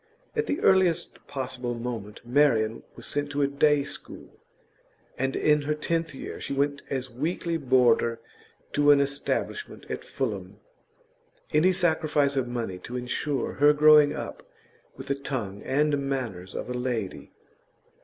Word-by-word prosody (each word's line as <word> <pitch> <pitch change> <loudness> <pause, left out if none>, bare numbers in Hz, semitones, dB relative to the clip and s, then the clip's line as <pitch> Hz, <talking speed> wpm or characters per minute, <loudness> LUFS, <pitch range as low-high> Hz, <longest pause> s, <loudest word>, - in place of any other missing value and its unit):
At 450 0 0
the 290 - -1
earliest 190 -3 +2
possible 125 -3 -4
moment 115 -3 -6
Marian 120 -4 +2
was - - -10
sent 145 0 -2
to 145 0 +1
a - - +3
day 145 +1 +3
school, - - -10 0.8
and 135 +1 -1
in 150 -1 +3
her 150 +1 -1
tenth 165 0 -2
year - - -7
she - - -3
went 140 +1 0
as 130 -1 -3
weekly 165 +6 -2
boarder 125 -5 +3 0.5
to 145 0 +3
an 145 -1 +7
establishment 140 - -2
at - - -4
Fulham; - - -4 1.0
any 160 +5 +5
sacrifice 155 -5 +2
of 130 -2 0
money 115 -7 -4
to 125 +7 -6
insure 125 +2 -2
her 145 +1 +7
growing 150 -1 +7
up - - -6 0.6
with - - -7
the 140 - 0
tongue 125 -8 -4
and 150 +2 +1
manners 110 -9 -4
of - - -4
a 125 - -3
lady. 125 -6 -3
140 Hz, 145 wpm, -27 LUFS, 125-150 Hz, 1.0 s, an